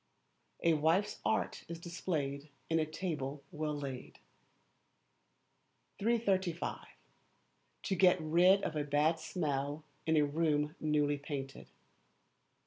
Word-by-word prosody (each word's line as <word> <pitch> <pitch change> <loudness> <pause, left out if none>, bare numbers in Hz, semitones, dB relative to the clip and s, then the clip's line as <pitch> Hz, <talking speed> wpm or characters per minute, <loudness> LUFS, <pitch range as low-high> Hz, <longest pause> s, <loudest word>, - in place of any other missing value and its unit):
[A 170 - +5
WIFE'S 165 +7 +2
ART 220 +1 0
IS 170 - -5
DISPLAYED 155 -5 -3 0.2
IN 165 - +4
A 155 - 0
TABLE 150 -4 -4
WELL 150 0 -2
LAID.] 135 -3 -6 1.8
335. 195 -6 0 1.0
To 190 - 0
Get 185 0 +5
Rid 175 +5 +4
of 160 - -2
a 150 - 0
Bad 150 +3 +2
Smell 145 -3 -2 0.2
in 160 0 +4
a 150 - +5
Room 150 0 +1
Newly 150 -1 +1
Painted. 140 -2 -6
155 Hz, 110 wpm, -34 LUFS, 145-175 Hz, 1.8 s, A